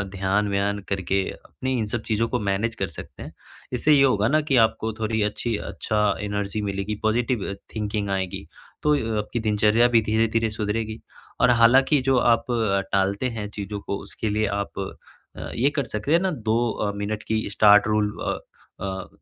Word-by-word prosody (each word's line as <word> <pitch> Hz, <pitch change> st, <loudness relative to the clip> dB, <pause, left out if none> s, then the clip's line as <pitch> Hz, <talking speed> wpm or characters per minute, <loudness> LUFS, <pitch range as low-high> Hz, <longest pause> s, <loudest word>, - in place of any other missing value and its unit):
ध्यान-व्यान 100 Hz, +1 st, 0 dB
करके 95 Hz, 0 st, 0 dB
अपनी 130 Hz, 0 st, -4 dB
इन 110 Hz, -, 0 dB
सब 120 Hz, -, -1 dB
चीज़ 110 Hz, +1 st, +2 dB
को 115 Hz, -, 0 dB
मैनेज 105 Hz, +3 st, -1 dB
कर 95 Hz, -3 st, -2 dB
सकते -, -, -9 dB
हैं, -, -, -9 dB, 0.4 s
इससे 150 Hz, +5 st, +3 dB
ये 140 Hz, -1 st, +6 dB
होगा 110 Hz, -6 st, +3 dB
ना 155 Hz, +5 st, +3 dB
कि 135 Hz, -, +3 dB
आपको 110 Hz, 0 st, -3 dB
थोड़ी 110 Hz, 0 st, 0 dB
अच्छी 115 Hz, +2 st, -2 dB, 0.2 s
अच्छा 105 Hz, -1 st, -1 dB, 0.2 s
एनर्जी 100 Hz, 0 st, -2 dB
मिलेगी 100 Hz, +1 st, -2 dB
पॉजिटिव 115 Hz, -2 st, 0 dB, 0.2 s
थिंकिंग 105 Hz, -1 st, -2 dB
आएगी, 95 Hz, -2 st, -3 dB, 0.4 s
तो 150 Hz, 0 st, +4 dB
य -, -, +1 dB, 0.2 s
आपकी 105 Hz, +3 st, -2 dB
दिनचर्या 110 Hz, +2 st, +3 dB
भी 120 Hz, -1 st, +4 dB
धीरे-धीरे 110 Hz, +1 st, +1 dB
सुधरेगी। 110 Hz, +1 st, -3 dB, 0.4 s
और 125 Hz, -, +5 dB
हालाँकि 125 Hz, +5 st, +5 dB
जो 135 Hz, -1 st, +3 dB
आप 120 Hz, -1 st, +3 dB, 0.5 s
टालते 100 Hz, +4 st, +1 dB
हैं 105 Hz, -, -3 dB
चीज़ों 105 Hz, 0 st, -5 dB
को 100 Hz, -, -4 dB
उसके 110 Hz, -, -4 dB
लिए 105 Hz, +1 st, +1 dB
आप 100 Hz, -, -5 dB, 0.6 s
अ, -, -, -6 dB
ये 130 Hz, +5 st, +3 dB
कर 145 Hz, -, +1 dB
सकते 110 Hz, +6 st, -3 dB
हैं 170 Hz, -, +6 dB
ना 190 Hz, +1 st, 0 dB
2 115 Hz, -6 st, -1 dB
अ, 105 Hz, -1 st, -2 dB
मिनट 105 Hz, +1 st, -3 dB
की 110 Hz, 0 st, 0 dB
स्टार्ट 105 Hz, 0 st, +6 dB
रूल 105 Hz, -1 st, +1 dB
अ -, -, -1 dB, 0.5 s
अ, 95 Hz, -1 st, -4 dB
110 Hz, 180 wpm, -24 LUFS, 100-115 Hz, 0.6 s, ये